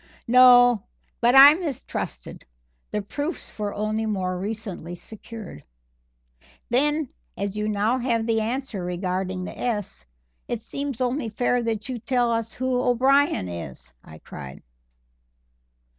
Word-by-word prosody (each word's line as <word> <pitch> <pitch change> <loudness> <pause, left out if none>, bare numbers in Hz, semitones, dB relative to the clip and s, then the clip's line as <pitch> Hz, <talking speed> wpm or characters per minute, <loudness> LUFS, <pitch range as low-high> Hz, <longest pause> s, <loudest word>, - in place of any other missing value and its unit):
"No, 245 -2 +7 0.4
but 240 +2 +4
I 275 +2 +11
mistrusted; 285 - -5 0.5
the 210 - -2
proofs 290 - -5
were 205 -1 -1
only 215 +2 -2
more 185 -3 -1
recently 195 -4 -5
secured." 220 - -10 1.1
"Then, 295 +3 +2 0.3
as 200 +1 -3
you 210 0 -1
now 215 +5 +1
have 235 -3 0
the 225 -1 +1
answer 230 -3 -3
regarding 185 +1 -3
the - - -7
'S,' 205 - -4 0.4
it 235 -2 -4
seems 275 0 -4
only 250 -1 -1
fair 245 +3 0
that 225 -2 -2
you 255 -2 -4
tell 245 0 +1
us 230 -1 -2
who 255 -1 -1
O'Brien 265 - +3
is," 65 -8 -8
I 80 - -13
cried. 65 -3 -10
225 Hz, 130 wpm, -24 LUFS, 200-250 Hz, 1.1 s, I